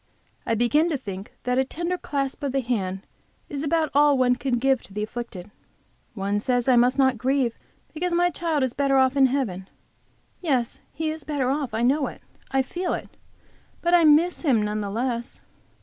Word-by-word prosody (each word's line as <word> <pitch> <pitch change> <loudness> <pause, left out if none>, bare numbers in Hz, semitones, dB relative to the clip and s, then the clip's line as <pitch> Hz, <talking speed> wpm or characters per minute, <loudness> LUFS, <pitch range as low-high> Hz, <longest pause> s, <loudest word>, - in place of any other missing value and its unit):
I 230 - +2
begin 295 +9 +2
to 305 - 0
think 200 -5 -8
that 250 +1 +1
a - - +4
tender 340 +6 -3
clasp 275 -6 -3
of 280 -2 -2
the 270 - +1
hand 195 -6 -2 0.4
is 280 -1 -4
about 315 +1 0
all 290 0 +5
one 250 -1 +3
can 250 -1 -1
give 265 +1 +2
to 195 - -13
the 210 - -1
afflicted. 215 -4 -7 0.6
One 200 0 -1
says 245 +2 0
I 255 - +5
must 245 +2 +4
not 265 -4 +3
grieve, 260 -2 0 0.3
because 350 +3 -2
my 350 +1 +2
child 320 -5 -1
is 255 -2 -1
better 275 0 +2
off 260 0 +3
in 270 -1 +5
heaven. 210 -9 -2 0.7
Yes, 260 -9 -1
he 315 +1 -2
is 315 -1 -7
better 275 -4 -1
off; 275 -5 -2
I 225 - 0
know 275 +4 +2
it, - - -10 0.3
I 270 0 +2
feel 355 +7 -2
it; - - -8 0.7
but 345 +1 +2
I 345 -1 +6
miss 315 +3 +4
him 255 -10 +2
none 210 0 -2
the 200 - -3
less. 235 +2 -3
265 Hz, 195 wpm, -24 LUFS, 235-295 Hz, 0.7 s, I